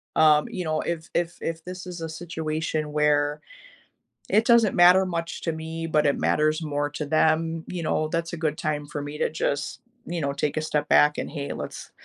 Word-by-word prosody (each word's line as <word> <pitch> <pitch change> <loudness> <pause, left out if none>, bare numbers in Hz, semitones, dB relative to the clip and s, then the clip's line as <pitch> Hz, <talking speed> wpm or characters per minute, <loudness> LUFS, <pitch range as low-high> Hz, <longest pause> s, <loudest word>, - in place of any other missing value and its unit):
um, 150 -1 +5
you 180 - -4
know, 155 -1 0
if 165 -1 -4
if 170 0 -1
if 165 0 -4
this 180 +1 -7
is 175 -2 -7
a 165 - -4
situation 160 -2 -3
where 150 0 +2 0.9
it 215 - +4
doesn't 235 -4 +5
matter 180 +2 +7
much 170 -2 -4
to 165 - -1
me, 160 +1 -5
but 150 -1 +2
it 140 - +2
matters 155 +2 +2
more 145 -1 -1
to 150 +1 -4
them, 160 +2 +1
you 180 - -4
know, 155 0 0
that's 165 +1 -2
a 170 - -3
good 155 -1 -1
time 150 -2 -2
for 145 0 -5
me 145 +1 -6
to - - +1
just, 140 -3 -2 0.3
you 175 0 -3
know, 140 -2 -1
take 145 +1 -2
a - - +1
step 150 -1 -1
back 150 0 +5
and, - - -4
"Hey, 140 -2 -4
let's - - -7
155 Hz, 210 wpm, -25 LUFS, 150-165 Hz, 0.9 s, matter